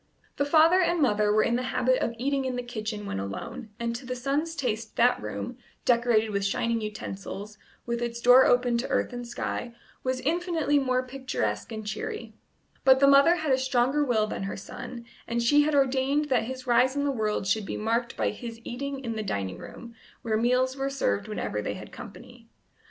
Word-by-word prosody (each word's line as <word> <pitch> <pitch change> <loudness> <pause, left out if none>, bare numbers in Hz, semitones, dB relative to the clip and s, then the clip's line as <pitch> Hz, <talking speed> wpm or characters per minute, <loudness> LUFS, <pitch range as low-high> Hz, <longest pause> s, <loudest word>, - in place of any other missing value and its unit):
The 285 - +1
father 320 +5 +5
and 345 -1 +1
mother 210 -7 +3
were 215 +1 +4
in 235 - +1
the - - -1
habit 255 0 +2
of 230 - -1
eating 275 +2 0
in 260 -1 -2
the 245 - -3
kitchen 215 -3 -5
when 95 - -3
alone, 220 - -6
and 235 0 -2
to 240 - -6
the 250 0 -4
son's 285 +6 -1
taste 225 -6 -3
that 245 +1 +3
room, 245 +1 -5 0.3
decorated 235 -3 +3
with 200 -1 -1
shining 230 +3 0
utensils, 210 0 -6 0.3
with 235 0 -2
its 235 0 -3
door 250 +2 +7
open 245 -1 +3
to 245 - -2
earth - - 0
and 245 0 -6
sky, 235 0 -4 0.3
was 255 0 -1
infinitely 320 -1 +1
more 255 -1 0
picturesque 250 - -3
and 220 -1 -6
cheery; 215 +2 -5 0.5
but 265 0 +6
the 280 - +6
mother 280 +5 +6
had 315 -4 -1
a 260 - +2
stronger 260 +2 +2
will 230 -6 +2
than 215 - -5
her 195 - -4
son, 235 +5 -8 0.2
and 235 0 -1
she 290 +5 +5
had 295 0 +1
ordained 275 +2 +2
that 245 -4 +2
his 255 +1 -6
rise 255 +2 +3
in 285 - 0
the 285 - +1
world 215 -5 -1
should 200 +1 0
be - - -3
marked 230 +2 -1
by - - +1
his 230 -2 -8
eating 275 +3 -5
in 230 -1 -3
the 220 - -2
dining 100 - -3
room, 235 -1 -10 0.3
where 220 -2 0
meals 250 +3 +2
were 270 0 -2
served 100 - -1
whenever 155 - -3
they - - -3
had - - -10
company. - - -12
245 Hz, 205 wpm, -27 LUFS, 220-270 Hz, 0.5 s, door